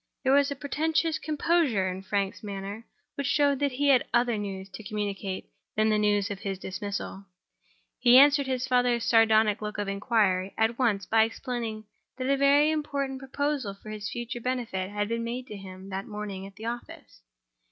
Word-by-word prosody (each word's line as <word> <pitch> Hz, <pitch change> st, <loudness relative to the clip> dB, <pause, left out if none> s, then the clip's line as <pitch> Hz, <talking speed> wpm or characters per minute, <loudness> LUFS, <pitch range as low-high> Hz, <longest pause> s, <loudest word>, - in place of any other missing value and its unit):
There 265 Hz, 0 st, +3 dB
was 280 Hz, 0 st, +4 dB
a 280 Hz, -, -3 dB
portentous 315 Hz, +3 st, 0 dB
composure 300 Hz, -, +1 dB
in 185 Hz, +1 st, -4 dB
Frank's 195 Hz, 0 st, -2 dB
manner 200 Hz, +2 st, -6 dB, 0.3 s
which 280 Hz, -2 st, -3 dB
showed 285 Hz, -1 st, +3 dB
that 285 Hz, -2 st, 0 dB
he 285 Hz, +2 st, +1 dB
had 260 Hz, -3 st, +5 dB
other 240 Hz, -1 st, +2 dB
news 195 Hz, -2 st, -5 dB
to 190 Hz, +3 st, -9 dB
communicate 200 Hz, -2 st, -4 dB, 0.2 s
than 215 Hz, 0 st, +3 dB
the 215 Hz, -1 st, +3 dB
news 205 Hz, 0 st, +2 dB
of 200 Hz, -, -5 dB
his 195 Hz, -1 st, -3 dB
dismissal. 195 Hz, +1 st, -5 dB, 0.8 s
He 245 Hz, 0 st, +7 dB
answered 280 Hz, 0 st, +6 dB
his 260 Hz, -1 st, -1 dB
father's 245 Hz, -2 st, +2 dB
sardonic 220 Hz, -2 st, +4 dB
look 210 Hz, 0 st, -4 dB
of 205 Hz, -1 st, -2 dB
inquiry 200 Hz, -2 st, +1 dB
by 220 Hz, -, +3 dB
at 230 Hz, +2 st, 0 dB
once 210 Hz, -6 st, +1 dB
explaining 225 Hz, 0 st, 0 dB, 0.3 s
that 255 Hz, 0 st, -2 dB
a -, -, +4 dB
very 285 Hz, +2 st, +4 dB
important 280 Hz, -3 st, -2 dB
proposal 270 Hz, -5 st, -2 dB
for 215 Hz, +2 st, -10 dB
his 210 Hz, -1 st, -5 dB
future 240 Hz, +1 st, -5 dB
benefit 230 Hz, -7 st, -2 dB
had 205 Hz, 0 st, -2 dB
been 230 Hz, +1 st, -2 dB
made 245 Hz, +2 st, -4 dB
to 210 Hz, -, -6 dB
him, 190 Hz, -1 st, -10 dB
that 195 Hz, 0 st, -4 dB
morning, 205 Hz, -2 st, -6 dB
at 195 Hz, -, -15 dB
the 220 Hz, +2 st, -9 dB
office. 235 Hz, -, -7 dB
225 Hz, 185 wpm, -28 LUFS, 200-265 Hz, 0.8 s, He